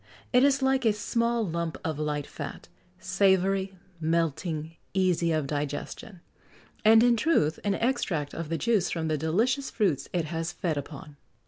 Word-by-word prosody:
It 250 +1 +6
is 275 -1 +3
like 265 0 +2
a 220 -2 +4
small 230 +2 0
lump 170 -1 -3
of 155 -2 -2
light 150 -1 -2
fat - - -8 0.3
savoury, 190 0 +1 0.2
melting, 160 0 -1 0.2
easy 180 -3 +2
of 155 -2 0
digestion; 150 +6 -5 0.6
and, 225 +1 +7
in 240 -1 +5
truth, 215 - +2
an 200 -1 +1
extract 195 - -1
of 165 -2 -5
the 165 - -1
juice 215 -4 +1
from 160 -2 -2
the 155 - +1
delicious 230 - +1
fruits 190 - 0
it 175 -3 0
has 165 +1 -3
fed 170 -5 -2
upon." 145 0 -8
175 Hz, 155 wpm, -27 LUFS, 160-220 Hz, 0.6 s, and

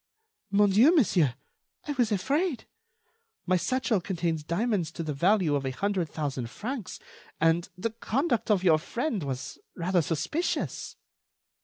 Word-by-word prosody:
"Mon 205 +1 +4
Dieu, 250 - +6
monsieur, 175 - +3 0.5
I - - -1
was 245 -5 +1
afraid. 275 - 0 0.8
My 185 - +2
satchel 230 +1 +1
contains 170 -4 -2
diamonds 180 0 0
to 165 - -4
the 155 -2 -3
value 180 +1 +3
of 140 -1 0
a 135 - -1
hundred 185 +4 -1
thousand 135 -6 -3
francs, 230 - -5 0.4
and 165 +2 +2
the 220 +5 -2
conduct 240 +3 -1
of 200 -3 +3
your 160 -4 +5
friend 235 - -2
was 130 -2 -5 0.2
rather 180 0 +1
suspicious." 170 - -2
185 Hz, 140 wpm, -28 LUFS, 160-230 Hz, 0.8 s, Dieu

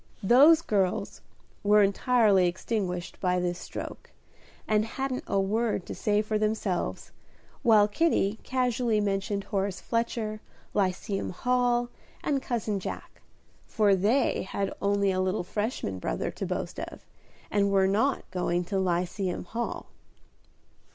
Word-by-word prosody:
"Those 290 - +7
girls" 195 - -1 0.4
were 210 0 +5
entirely 200 -2 +3
extinguished 180 -1 -3
by 180 -1 +1
this 175 0 -2
stroke, - - -7 0.6
and 215 0 +3
hadn't 255 +3 -3
a 195 - +1
word 210 0 0
to - - -6
say 210 0 +1
for 215 0 -1
themselves, 210 -4 -2 0.5
while 220 -5 +5
Kitty 215 -4 +1
casually 250 -3 0
mentioned 200 0 -1
Horace 195 -2 -2
Fletcher, 225 -1 -2 0.3
Lyceum 195 +1 -1
Hall, 245 +3 +1 0.3
and 280 -2 0
Cousin 220 -5 -2
Jack, - - -7 0.5
for 205 -3 +3
they 220 +8 +2
had 195 0 -3
only 200 0 +2
a 185 0 0
little 185 +1 0
Freshman 205 - -3
brother - - -2
to - - -5
boast - - -4
of, - - -8 0.5
and 200 -1 +2
were 195 -1 +3
not 220 +8 +1
going 180 -1 0
to 190 +2 -2
Lyceum 180 +1 -1
Hall. 230 +5 -4
205 Hz, 130 wpm, -28 LUFS, 190-230 Hz, 0.6 s, Those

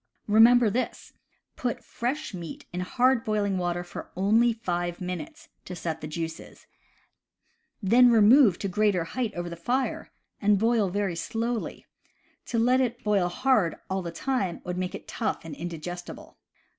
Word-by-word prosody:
Remember 225 +1 +6
this: 255 +5 -3 0.4
put 245 -2 -3
fresh 250 +2 -3
meat 190 - -7
in 180 - -3
hard 245 +6 +2
boiling 205 -3 0
water 175 0 -1
for 175 - -9
only 220 +6 +3
five 175 -6 -3
minutes, 185 - -6 0.2
to 180 - -6
set 160 -2 -4
the 155 - -5
juices; 160 +1 -6 1.2
then 240 +5 +6
remove 225 -2 +6
to 200 - -3
greater 200 -2 +1
height 235 +6 -3
over 175 0 -4
the 170 - -6
fire 245 +10 -2 0.3
and 205 0 +4
boil 225 -1 +2
very 195 -2 -1
slowly 230 +6 -3 0.3
— - - -39
to 235 - -2
let 250 +3 +4
it 240 -1 -2
boil 205 -4 +2
hard 215 -3 +2 0.2
all 190 0 0
the 170 - -5
time 195 -1 -2
would 180 0 -4
make 180 0 -3
it - - -10
tough 225 - -3
and 160 - -7
indigestible. 175 +2 -7
205 Hz, 155 wpm, -27 LUFS, 175-240 Hz, 1.2 s, Remember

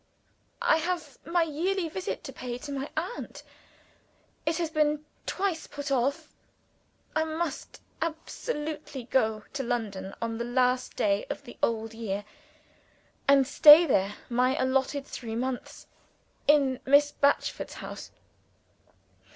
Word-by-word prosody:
"I 315 - +5
have 325 -4 -3
my 340 0 +3
yearly 340 +4 -1
visit 360 +4 -4
to - - -7
pay 245 -1 -5
to 285 +3 -8
my 275 0 -3
aunt. 360 +9 -4 1.0
It 320 0 +2
has 335 -2 -1
been 300 -1 +1 0.2
twice 375 -4 -1
put 285 0 -6
off. 270 +1 0 0.8
I 315 - +3
must 320 -1 -4 0.2
absolutely 310 - -4
go 220 -3 +1
to 275 - -2
London 210 -6 -3
on 230 0 -3
the - - -1
last 250 +1 +1
day 200 0 +1
of - - -5
the 240 - -11
old 225 -1 0
year, 205 -3 -4 1.0
and 275 -1 +6
stay 300 +4 +9
there 200 - +1
my 250 +2 +2
allotted 270 +2 +1
three 225 -5 -6
months 250 +1 -4 0.6
in 275 -3 +4
Miss 285 +2 +5
Batchford's 280 0 0
house. - - -8
275 Hz, 125 wpm, -28 LUFS, 240-315 Hz, 1.0 s, stay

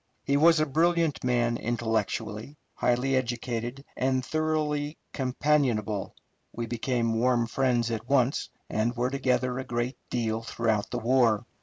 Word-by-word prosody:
He 140 - +1
was 165 +2 +6
a 155 - +3
brilliant 165 +1 +1
man 120 -1 +1
intellectually, 110 +2 -2 0.2
highly 125 +2 +1
educated, 120 +1 -2
and 130 0 0
thoroughly 155 -1 -1 0.2
companionable. 125 -7 0 0.4
We 120 - -4
became 115 -1 -1
warm 120 -1 +3
friends 120 -1 +1
at 115 +1 -4
once, 135 0 +2 0.2
and 115 +3 0
were 125 +1 0
together 130 -1 0
a - - -3
great 120 0 -3
deal 115 -2 -1
throughout 115 -2 -1
the 120 - -3
war. 120 -2 +3
125 Hz, 135 wpm, -28 LUFS, 115-135 Hz, 0.4 s, was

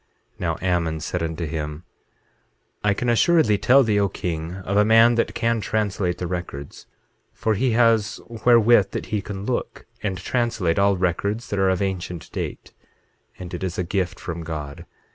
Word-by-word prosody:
8:13 - - -33
Now - - -1
Ammon 85 -3 0
said 85 +3 -3
unto 80 +1 -3
him: 75 0 -5 1.0
I 105 -1 +2
can 125 - -2
assuredly 120 - +4
tell 135 +2 +5
thee, 105 -3 +2
O 100 -1 +2
king, 85 -1 -4
of 100 - -1
a 105 - +5
man 115 +2 +6
that 115 - 0
can 115 -1 0
translate 100 -4 -1
the 90 - -4
records; 85 -6 -6 0.5
for 110 - 0
he 120 +3 +1
has 115 -2 +3
wherewith 115 -2 +4
that - - -3
he 105 - +1
can 100 -1 -6
look, 125 0 -3 0.2
and 100 -3 -2
translate 115 -7 0
all 100 -1 +3
records 100 +5 -1
that 100 - -1
are 95 -1 +3
of 95 +1 +1
ancient 90 -3 -4
date; - - -6 0.6
and 90 -1 -8
it 90 - -5
is 90 -1 -3
a 90 - 0
gift 95 +1 -2
from 85 -1 -5
God. 75 -3 -6
100 Hz, 180 wpm, -23 LUFS, 85-110 Hz, 1.0 s, man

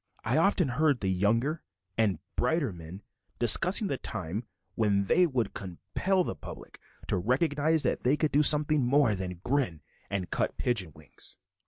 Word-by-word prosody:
I - - 0
often 195 -5 +3
heard 145 +1 +1
the 95 -2 0
younger 115 - 0 0.3
and 110 -4 +1 0.2
brighter 155 - 0
men 85 +3 -11 0.3
discussing 180 - +3
the 140 -9 -3
time 100 +2 -5 0.3
when 100 -1 +1
they 175 - +3
would 130 -6 -2
compel 180 - -2
the - - -4
public - - -12 0.3
to - - 0
recognize 145 - +1
that - - 0
they 130 +4 +1
could 155 -1 0
do 145 - +3
something 150 -1 +6
more 130 -2 +3
than 90 -2 -6
grin 125 - -1 0.3
and 95 -3 -4
cut - - -2
pigeon 105 -10 -1
wings. 75 -1 -11
125 Hz, 160 wpm, -28 LUFS, 95-150 Hz, 0.3 s, something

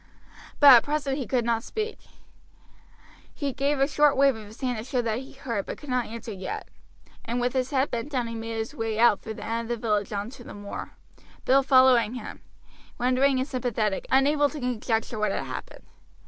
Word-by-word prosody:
But 285 -2 +10
at 240 - +7
present 290 -2 -1
he 260 - -4
could 245 -3 0
not 230 -1 +1
speak. 435 - -4 1.4
He 280 -2 -3
gave 280 +3 0
a 275 - +4
short 295 -1 +3
wave 275 -2 +4
of 215 -2 -10
his 215 +3 -14
hand 250 -4 -1
to - - -5
show 255 +1 -2
that 230 -1 -1
he 265 - -11
heard, 235 -7 -4
but - - -5
could 295 -3 -8
not 250 -1 0
answer 230 0 -7
yet, 190 -2 -6 0.5
and 240 +1 -2
with 245 0 0
his 260 -1 0
head 275 -1 +1
bent 235 +4 -3
down 235 -5 -2
made 225 0 -5
his 225 +5 -4
way 225 -6 -3
out 235 -3 +5
through 220 - -6
the - - -8
end 230 0 -3
of 240 -1 -2
the 230 - -5
village 210 -1 0
on 205 +2 -3
to 255 - -12
the - - -10
moor 205 0 -7 0.5
Bill 270 +1 +5
following 255 -4 +5
him, 250 - -8 0.6
wondering 255 +2 +2
and 260 +1 -1
sympathetic, 230 -7 -2
unable 285 +2 +3
to 305 - -7
conjecture 230 -3 -2
what 215 - +1
had - - -2
happened. - - -8
245 Hz, 210 wpm, -26 LUFS, 225-270 Hz, 1.4 s, But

